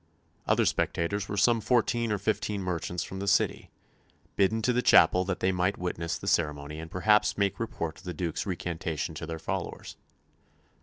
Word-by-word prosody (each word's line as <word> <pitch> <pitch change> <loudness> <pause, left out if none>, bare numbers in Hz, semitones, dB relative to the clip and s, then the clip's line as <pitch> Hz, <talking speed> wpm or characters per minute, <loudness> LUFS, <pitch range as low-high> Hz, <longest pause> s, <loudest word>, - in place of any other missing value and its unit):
Other - - +3
spectators 100 +4 -1
were 100 - -3
some 115 +2 +4
fourteen 120 -1 +1
or 105 - +1
fifteen 100 0 -1
merchants 90 -1 -2
from 95 - -7
the 100 - -4
City, 95 - +1 0.7
bidden 110 +3 +2
to 125 - +2
the 125 - +2
chapel 90 -6 +6
that 95 -1 -3
they 95 - +2
might 90 +2 0
witness 85 -1 -3
the - - -10
ceremony 75 -5 0
and 80 0 -7
perhaps 105 +4 +3
make 100 -2 0
report 85 -7 -4
of 95 - -17
the 90 - -3
Duke's 85 +3 -3
recantation 85 -3 -3
to 80 +1 -6
their 80 -1 -4
fellows. - - -5
95 Hz, 175 wpm, -28 LUFS, 85-105 Hz, 0.7 s, chapel